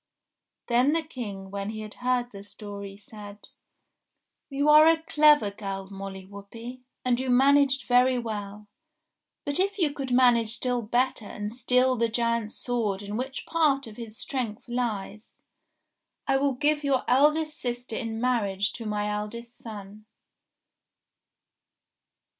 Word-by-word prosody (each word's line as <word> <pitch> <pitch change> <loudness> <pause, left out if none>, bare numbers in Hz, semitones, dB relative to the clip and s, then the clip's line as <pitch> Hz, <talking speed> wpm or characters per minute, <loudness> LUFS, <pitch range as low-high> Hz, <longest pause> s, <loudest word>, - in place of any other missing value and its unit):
Then 250 +5 +3
the 330 0 +1
King 205 -10 -7
when 200 0 -4
he 215 0 -5
had 215 -1 -8
heard 250 -1 0
the 200 -1 -10
story 200 -1 -9
said, 205 0 -12 1.0
*'You 280 +1 0
are 305 +1 +8
a 325 0 +3
clever 300 -9 +4
girl, 195 -1 -6
Molly 195 -1 -7
Whuppie, 225 +6 -10 0.2
and 245 -1 +2
you 260 0 -2
managed 275 +2 +4
very 250 +1 +4
well; 210 -3 -5 0.8
but 285 +2 -1
if 395 +2 +1
you 315 -7 +1
could 275 -3 -5
manage 240 -3 +4
still 250 0 0
better 240 0 0
and 210 +1 -5
steal 255 +1 +2
the 230 0 +1
giant's 230 -1 -1
sword 215 -5 -2
in 205 +1 -5
which 260 +3 -4
part 300 -5 +2
of 220 -2 -11
his 225 -2 -8
strength 250 -7 -4
lies, 220 -4 -4 0.9
I 270 -1 +2
will 275 -1 +1
give 295 +3 +1
your 275 -2 +1
eldest 300 +4 +3
sister 245 -1 -4
in 225 -2 -4
marriage 215 -5 0
to 230 -2 -6
my 210 0 -1
eldest 215 +3 -5
son." 215 -3 -10
240 Hz, 140 wpm, -27 LUFS, 210-265 Hz, 1.0 s, are